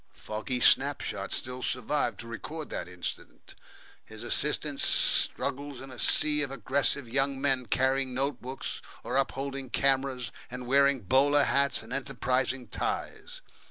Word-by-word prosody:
Foggy 110 +4 -4
snapshots - - +2
still 125 0 -3
survive 130 +4 -1
to 120 - -9
record 150 +7 -7
that - - -4
incident. 90 -1 -7 0.5
His - - -9
assistant - - +2
struggles 140 -1 +2
in 135 0 -10
a 125 - -11
sea 150 -1 +5
of 145 - 0
aggressive 135 +1 +1
young 135 +2 0
men 135 -3 +1
carrying 130 0 +1
note 135 0 -1
books 130 +2 -5 0.2
or - - -4
upholding 135 0 -2
cameras 135 -2 0 0.2
and 125 0 -7
wearing 140 0 +3
bowler 140 +7 +4
hats 140 -4 +1
and 115 +3 -9
enterprising 130 -2 -1
ties. - - -4
135 Hz, 135 wpm, -28 LUFS, 125-140 Hz, 0.5 s, sea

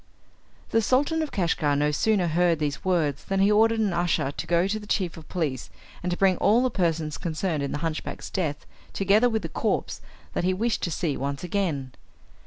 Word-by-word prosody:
The 225 - +3
Sultan 285 +8 +2
of 310 - -3
Kashgar 160 -5 +1
no 150 +1 +2
sooner 200 +4 +2
heard 170 +1 +2
these 150 -2 -3
words 165 -7 0
than 195 0 -1
he 200 +2 +4
ordered 225 +2 +4
an 205 -4 +1
usher 170 -5 0
to 160 - -6
go 170 +1 +3
to 215 +2 -2
the 210 - -12
chief 180 -6 -1
of 160 - -12
police 150 -8 -2 0.3
and 180 - -2
to 175 - -1
bring 190 -2 +3
all 225 +5 +4
the 255 - +1
persons 165 -6 -1
concerned 160 -1 -2
in 140 - -2
the - - -2
hunchback's 160 -1 -4
death, 155 -6 -2 0.3
together 205 +5 +3
with 220 -2 -1
the - - -2
corpse, - - -2 0.3
that - - -1
he 185 +1 +1
wished 225 +3 0
to 175 - -1
see 155 -3 -1
once 140 +2 -3
again. 165 -8 -2
175 Hz, 205 wpm, -26 LUFS, 155-205 Hz, 0.3 s, he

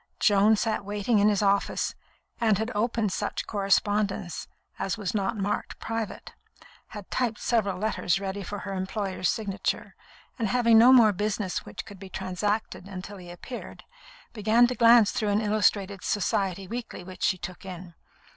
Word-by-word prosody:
Joan 205 +1 +5
sat 215 0 -1
waiting 205 +2 0
in 205 +1 +5
his 210 -1 +1
office, 200 0 +1 0.5
and 220 -4 +3
had 220 +3 -2
opened 220 -1 0
such - - -3
correspondence 200 -2 0 0.3
as 195 - -2
was 205 -4 -3
not 200 0 -1
marked 205 +1 -2
"Private," 225 -2 -5 0.5
had 210 -3 -10
typed 235 -4 0
several 205 -6 0
letters 195 -3 0
ready 195 0 -4
for 205 +2 -5
her 195 - -5
employer's 190 -1 -2
signature, 205 -4 -2 0.5
and 225 - +1
having 230 -1 +5
no 245 +3 +8
more 230 -5 +7
business 205 -1 -2
which - - -7
could 200 -2 -12
be 195 0 -10
transacted 190 +1 -3
until 200 +1 -8
he 180 -2 -11
appeared, 175 +8 -9 0.5
began 220 +2 +4
to 245 - 0
glance 235 -3 +6
through 215 - -1
an 205 +1 +2
illustrated 205 -2 +1
Society 195 -2 -1
weekly 230 -3 -6
which 185 0 -11
she 185 - +2
took 180 0 -8
in. 180 -2 -9
205 Hz, 160 wpm, -27 LUFS, 190-220 Hz, 0.5 s, no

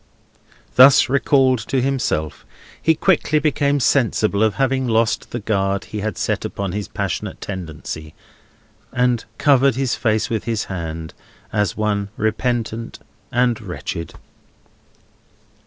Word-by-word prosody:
Thus 130 -2 +8
recalled 135 -2 +3
to 135 - +1
himself, 125 - -1 0.4
he 160 - +3
quickly 155 -3 +2
became 145 -2 +1
sensible 110 -5 +2
of 110 -2 +2
having 130 0 +1
lost 115 -1 +1
the 120 - -4
guard 100 -2 0
he 105 - -6
had 105 -2 -3
set - - -1
upon 100 -2 -3
his 100 0 -4
passionate - - -4
tendency, 80 -4 -7 0.8
and 125 -2 +1
covered 135 -3 +4
his 135 -1 0
face 110 -1 +1
with 110 -3 -3
his 115 -3 -1
hand, 80 -3 -6 0.4
as 105 -4 0
one 105 -2 -1
repentant 115 +1 -2 0.3
and 120 -2 +1
wretched. 90 -4 -6
110 Hz, 125 wpm, -20 LUFS, 100-130 Hz, 0.8 s, Thus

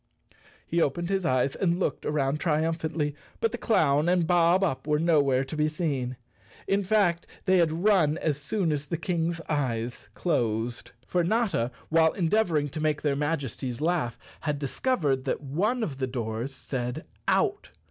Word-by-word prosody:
He 170 +1 0
opened 170 +4 0
his 195 -3 0
eyes 130 +1 +1
and 175 -2 +1
looked 150 -7 -1
around 145 -1 0
triumphantly, 160 -1 0 0.3
but 225 - +1
the 240 - -5
clown 155 -7 +3
and 180 -2 +3
Bob 175 +2 +4
Up 150 -5 -1
were 150 0 +3
nowhere 145 -5 +3
to 135 - -6
be 150 0 +2
seen. 140 -6 -2 0.5
In 200 +1 +2
fact 185 -4 +2 0.2
they 190 -1 +4
had 165 0 +1
run 170 -8 +4
as 150 -4 -1
soon 175 +2 0
as 145 -1 -2
the 170 - -2
Kang's 170 0 -1
eyes 125 -5 -2
closed. 120 -7 -1 0.2
For 175 -1 +1
Notta, 195 - +1 0.2
while 160 0 +4
endeavoring 170 -5 +1
to 155 - -6
make 155 -1 0
their 145 -2 +2
Majesties 140 -4 -2
laugh, 155 -7 0 0.2
had 150 -2 -2
discovered 140 - 0
that - - -1
one 205 - 0
of 140 -10 -4
the 130 - 0
doors 120 0 -3
said 125 -2 -4 0.2
"Out." - - +1
155 Hz, 165 wpm, -27 LUFS, 135-175 Hz, 0.5 s, Bob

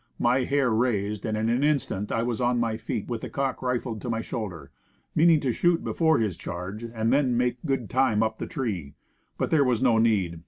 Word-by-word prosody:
My 125 +2 +2
hair 140 -3 +1
raised, 105 -3 0
and 110 0 -1
in 110 +1 0
an 120 +4 +1
instant 135 -9 0
I 115 - 0
was 120 0 -2
on 120 0 +2
my 115 -2 0
feet 110 - -4
with 120 -2 -4
the - - -6
cocked 135 -2 -2
rifle 125 -3 -2
to 120 - -6
my 115 -1 -1
shoulder 95 - -6 0.4
meaning 165 0 +5
to 130 - 0
shoot 175 +7 +2
before 160 -3 +2
his 105 -6 0
charge, 90 +6 -6
and 115 0 -1
then 135 -4 +2
make 125 0 +1
good 135 -5 -1
time 120 -4 +2
up 110 0 -2
the - - -4
tree. 105 - -4 0.4
But - - -1
there 155 -3 +5
was 125 -4 +1
no 120 -3 +3
need. 100 -7 +1
120 Hz, 220 wpm, -26 LUFS, 110-130 Hz, 0.4 s, meaning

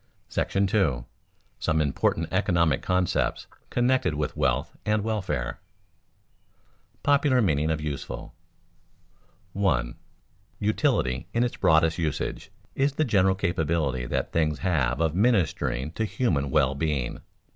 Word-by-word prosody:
§ 95 - +1
II. - - -9 0.6
SOME 80 0 +1
IMPORTANT 75 +2 0
ECONOMIC 85 -6 +2
CONCEPTS 90 -1 0 0.2
CONNECTED 120 -9 +1
WITH 75 +2 -2
WEALTH 65 -5 0
AND 105 -1 +1
WELFARE 105 -8 -1 1.6
[Sidenote: - - -39
Popular 140 -2 +3
meaning 80 - +2
of 80 -1 0
useful] 70 -5 -5 1.2
1. 65 -12 0 0.6
_Utility, 105 - +1
in 120 - +3
its 120 - -2
broadest 80 +1 +3
usage, 80 -4 -3 0.2
is 135 +1 +1
the 155 +2 +1
general 95 -5 +3
capability 80 -8 -1
that - - -2
things 75 -2 +1
have 80 -9 +1
of 80 -2 +1
ministering 90 - +1
to 110 +6 -2
human 80 - 0
well 70 -1 +3
being. 70 -4 -2
80 Hz, 120 wpm, -26 LUFS, 75-105 Hz, 1.6 s, Popular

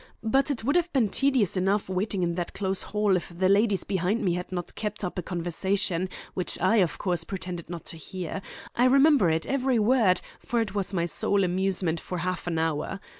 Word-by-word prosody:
But 270 +6 +2
it 265 -6 -2
would 285 +7 +1
have 350 0 0
been 245 -7 +3
tedious 260 -6 +2
enough 195 +2 +1
waiting 190 0 -1
in 170 -1 0
that 175 0 -4
close 190 -1 -1
hall 210 -2 +1
if 180 - -3
the 175 +2 0
ladies 200 0 +3
behind 195 +4 0
me 180 - +2
had 180 +1 -4
not 175 -2 -4
kept 210 -1 -4
up 180 0 -3
a - - -1
conversation, 180 +1 -1 0.2
which 180 - -2
I, 230 - +3
of 180 -6 +2
course, 175 -3 -1
pretended 180 -3 -6
not 170 -2 -7
to 165 - -7
hear. 185 +2 -6 0.3
I 245 - +3
remember 275 - +5
it, 160 0 0
every 265 -2 +1
word, 220 -4 +4 0.2
for 240 - -1
it 215 -4 -1
was 200 -2 -1
my 170 -3 0
sole 195 +3 +1
amusement 180 -2 0
for 180 - -5
half 180 +1 -3
an 170 -2 -1
hour. 160 +4 -1
190 Hz, 210 wpm, -27 LUFS, 175-215 Hz, 0.3 s, remember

